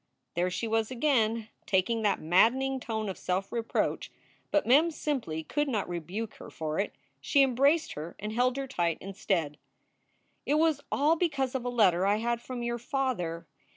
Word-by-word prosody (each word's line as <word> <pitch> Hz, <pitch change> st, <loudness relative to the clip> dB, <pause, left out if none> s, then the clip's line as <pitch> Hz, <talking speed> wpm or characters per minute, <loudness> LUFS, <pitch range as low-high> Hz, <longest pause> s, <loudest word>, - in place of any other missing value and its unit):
There 175 Hz, +1 st, +1 dB
she 225 Hz, +5 st, -3 dB
was 225 Hz, 0 st, +1 dB
again! 230 Hz, -4 st, +1 dB, 0.2 s
Taking 205 Hz, +4 st, +2 dB
that 210 Hz, -2 st, +2 dB
maddening 255 Hz, +11 st, +3 dB
tone 220 Hz, -3 st, -3 dB
of 190 Hz, -, -5 dB
self 185 Hz, +2 st, -2 dB
reproach. 230 Hz, -1 st, -1 dB, 0.4 s
But 300 Hz, -, +2 dB
Mem 290 Hz, +8 st, +5 dB
simply 260 Hz, -, -3 dB
could 295 Hz, -, -1 dB
not 220 Hz, -7 st, -1 dB
rebuke 180 Hz, +6 st, -4 dB
her -, -, -10 dB
for 155 Hz, -1 st, -3 dB
it. 200 Hz, -, -2 dB, 0.2 s
She 280 Hz, -2 st, +4 dB
embraced 275 Hz, +5 st, +2 dB
her 155 Hz, +3 st, -7 dB
and 210 Hz, +1 st, -5 dB
held 250 Hz, +2 st, +2 dB
her 275 Hz, -, -2 dB
tight, 175 Hz, -, -1 dB
instead. 180 Hz, -6 st, -2 dB, 0.8 s
"It 290 Hz, -, +1 dB
was 310 Hz, -2 st, +2 dB
all 300 Hz, +4 st, +3 dB
because 280 Hz, -7 st, 0 dB
of 260 Hz, -2 st, -3 dB
a -, -, 0 dB
letter 190 Hz, -7 st, +3 dB
I 205 Hz, -, +4 dB
had 235 Hz, +2 st, -1 dB
from 250 Hz, -1 st, -5 dB
your 240 Hz, 0 st, -2 dB
father. 230 Hz, -11 st, -2 dB
230 Hz, 175 wpm, -29 LUFS, 190-270 Hz, 0.8 s, Mem